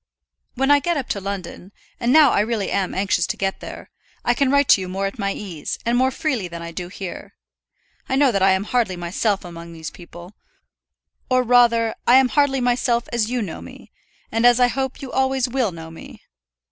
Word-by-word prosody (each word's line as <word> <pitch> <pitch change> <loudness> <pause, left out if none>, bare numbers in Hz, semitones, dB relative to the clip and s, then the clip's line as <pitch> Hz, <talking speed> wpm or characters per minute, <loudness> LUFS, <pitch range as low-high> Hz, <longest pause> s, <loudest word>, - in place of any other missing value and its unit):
When 270 +3 +2
I 290 - +6
get 340 +3 -1
up 270 - -3
to 200 - -2
London 190 -1 -6 0.3
and 240 0 +1
now 295 -2 +7
I - - +2
really 215 -1 -1
am 195 -2 -1
anxious 190 -3 +1
to - - -3
get 195 0 -2
there - - -10 0.3
I 240 - +3
can 275 +2 +1
write 280 0 +3
to 195 - +6
you 185 - -5
more 195 +2 -2
at 195 +5 -5
my 200 -1 0
ease, 175 -8 -5
and 235 +1 +1
more 260 +1 +3
freely 260 - -2
than 170 -1 -8
I 170 - -7
do 175 +1 -6
here. 185 0 -8 0.7
I 265 - +1
know 275 -1 +4
that 195 -3 -1
I 190 0 +5
am 190 +1 0
hardly 220 -4 0
myself 185 +3 -1
among 170 -1 -9
these 160 -1 -7
people, 175 +1 -13 1.0
or 255 0 +3
rather, 235 -2 +4
I 245 - +7
am 260 -1 +5
hardly 285 -1 +2
myself 245 -1 +1
as 230 -2 0
you 245 -2 -1
know 170 -5 -7
me, - - -13 0.4
and 225 +1 0
as 245 0 +6
I 245 -1 +5
hope 265 +1 -3
you 265 - -7
always 265 -1 +1
will 250 -4 0
know 165 -1 -10
me. 165 - -12
230 Hz, 215 wpm, -21 LUFS, 190-255 Hz, 1.0 s, now